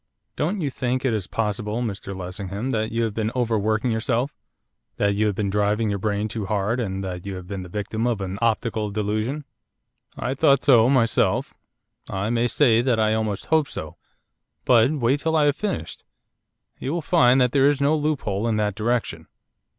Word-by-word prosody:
'Don't 180 +6 -1
you 145 -3 -1
think 130 +1 -2
it 125 - +2
is 105 -4 -2
possible, 105 +1 -2
Mr 100 -3 -5
Lessingham, 100 +6 -4
that 110 -2 -1
you 115 +1 0
have 110 -2 -1
been 110 0 -1
overworking 110 -1 +1
yourself 115 +5 -1 0.6
that 100 0 +2
you 105 +2 +1
have 105 - -1
been 100 -1 -1
driving 105 +1 +1
your 100 - -2
brain 105 +1 -1
too 110 -2 -5
hard, 105 +4 0
and 95 -4 -3
that 90 -2 -5
you 100 -1 -5
have 90 -1 -8
been 100 0 -5
the 90 - -9
victim 105 +4 -2
of 120 -4 0
an 95 0 -4
optical 110 -1 0
delusion?' 110 +7 -2 0.7
'I 130 - -2
thought 140 -1 +3
so 120 -5 +6
myself; 125 -4 +2 0.6
I 100 +3 -2
may 120 0 +2
say 120 -3 +3
that 120 -2 +1
I 110 0 +3
almost 110 -3 -2
hoped 160 -3 +2
so. 80 -1 -6 0.7
But 120 -1 +5
wait 140 -2 +1
till 160 +2 0
I 155 -2 +4
have 145 -1 +3
finished. 195 - -4 0.8
You 135 - -3
will 170 -2 -2
find 135 -6 +4
that 125 -1 +3
there 140 0 +4
is 145 -1 0
no 145 +2 +3
loophole 130 -9 -1
in 115 - +1
that 105 -1 0
direction. 115 +3 -2
110 Hz, 190 wpm, -23 LUFS, 105-130 Hz, 0.8 s, so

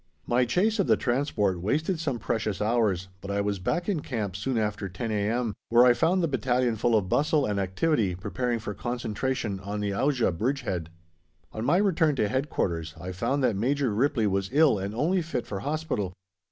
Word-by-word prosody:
My 125 +1 +2
chase 205 - +1
of 195 - +2
the - - +4
transport 120 - 0
wasted 155 - 0
some 140 -6 -1
precious 110 -2 -2
hours, 105 -4 +1
but 100 - -8
I 100 0 0
was 100 -1 -1
back 175 - -1
in 195 -6 0
camp 110 -10 -3
soon 120 +5 -2
after 105 -2 -1
10 110 +5 -4
a.m., 110 +2 0 0.2
where 120 +1 +6
I 125 - +7
found 170 +7 +2
the - - +3
battalion 125 -3 +1
full 115 +2 +2
of 100 -3 -1
bustle 145 - +2
and 105 -1 -1
activity, 100 - +1
preparing 105 +6 -2
for 105 -2 -5
concentration 120 -1 -2
on 100 +2 -4
the 105 -1 -1
Auja 125 -3 +1
bridgehead. 95 - -2 0.6
On 110 - -4
my 145 +8 +3
return 170 -7 +2
to 110 -5 +1
Headquarters 85 - -2
I 90 +3 -5
found 135 +10 -1
that 120 -5 +2
Major 130 +3 0
Ripley 125 +1 +1
was 95 -1 0
ill 145 -6 +4
and 100 +3 -4
only 175 +9 +1
fit 155 -7 -3
for 100 - -5
hospital. 140 - -2
115 Hz, 195 wpm, -27 LUFS, 100-140 Hz, 0.6 s, I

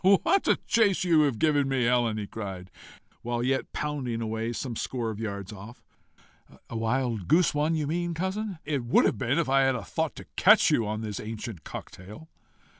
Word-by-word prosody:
"What 390 +4 +2
a - - +5
chase 210 -6 +3
you've 155 -8 +3
given 145 -2 +2
me, 135 -2 +1
Helen!" 120 -2 +2
he 105 - -3
cried, 95 -4 -7 0.5
while 120 0 -2
yet 135 +1 -1
pounding 135 -6 -3
away 110 0 -2
some 120 0 -4
score 115 -1 -3
of 105 - -7
yards 100 -2 -5
off. 105 +4 -11 0.9
"A - - -5
wild 115 -3 -1
goose 170 +2 +4
one 150 +2 +1
you 155 -2 -1
mean, 170 +3 -2
cousin?" 190 +3 -3
"It 145 -4 -1
would 120 - +4
have 105 - +1
been 125 +6 0
if 170 -4 +1
I 135 +1 +4
had 135 -2 +2
thought - - -2
to - - -10
catch - - +6
you 115 - +2
on 110 +1 -3
this 105 -3 -4
ancient 110 - -6
cocktail." 105 - -10
125 Hz, 190 wpm, -27 LUFS, 110-150 Hz, 0.9 s, catch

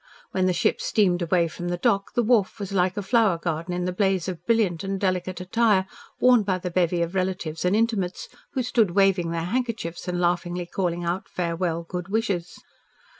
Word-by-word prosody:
When 185 0 +1
the - - +3
ship - - +1
steamed 185 -4 +2
away 170 0 +2
from 175 +2 -6
the 175 0 -1
dock, 195 +3 0
the 240 - +3
wharf 215 -4 +2
was 200 -2 -5
like 185 -1 +1
a 205 - -2
flower 215 -4 +3
garden 165 0 -3
in 180 0 -2
the 180 - -1
blaze 190 -2 +1
of 180 -2 -5
brilliant 205 -8 +2
and 195 0 -2
delicate 185 -1 -1
attire 195 +1 +2 0.3
worn 250 -2 +6
by 195 -2 0
the 180 0 -5
bevy 175 -1 +1
of 170 +2 -4
relatives 185 -4 -2
and 180 +3 +3
intimates 215 -5 0 0.3
who 260 - 0
stood 225 -7 +1
waving 195 -4 +3
their 165 0 -2
handkerchiefs 220 -5 -3
and 175 0 -1
laughingly 175 0 0
calling 175 -1 -2
out 175 +3 -2
farewell 170 -1 -2
good 180 +1 -5
wishes. 195 -5 -2
185 Hz, 195 wpm, -25 LUFS, 175-200 Hz, 0.3 s, worn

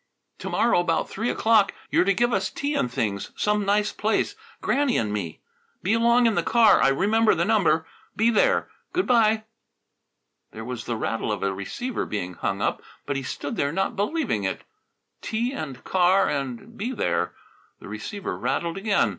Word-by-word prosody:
To - - -5
morrow 235 -5 +3
about 170 -2 0
three 225 +4 -2
o'clock 220 -3 +3 0.2
you're - - +3
to 200 - +3
give 240 +4 +2
us 195 - 0
tea 285 +1 -3
and 125 - 0
things, 105 -6 -2
some 210 -1 +1
nice 205 +1 +2
place 220 - 0 0.2
Granny 280 -3 +1
and 105 -2 -1
me. 90 -7 -4 0.4
Be 200 - +2
along 235 +1 +4
in 230 - +4
the - - +1
car. 230 -3 +5
I - - +5
remember 210 +11 +3
the - - +1
number. 170 -8 +2 0.3
Be 225 +2 +3
there. 220 - +3 0.3
Good 365 +1 +1
bye!" 220 -3 +3 1.1
There 110 0 -7
was 125 -1 -5
the 120 - -2
rattle 115 0 -2
of 105 - -3
a 100 0 0
receiver 240 - -4
being 90 -4 -3
hung 85 - -2
up. - - -1 0.2
But 140 - -2
he 135 - -1
stood 140 +2 -5
there 140 - +1
not 195 +4 -1
believing 210 - -1
it 95 - -3 0.6
tea 235 +4 -2
and 135 - -6
car 185 +1 +3
and 140 - -4
be 235 +5 -3
there - - -1 0.4
The - - -11
receiver 205 -3 -5
rattled 170 0 -2
again. 200 - +2
200 Hz, 180 wpm, -25 LUFS, 135-225 Hz, 1.1 s, car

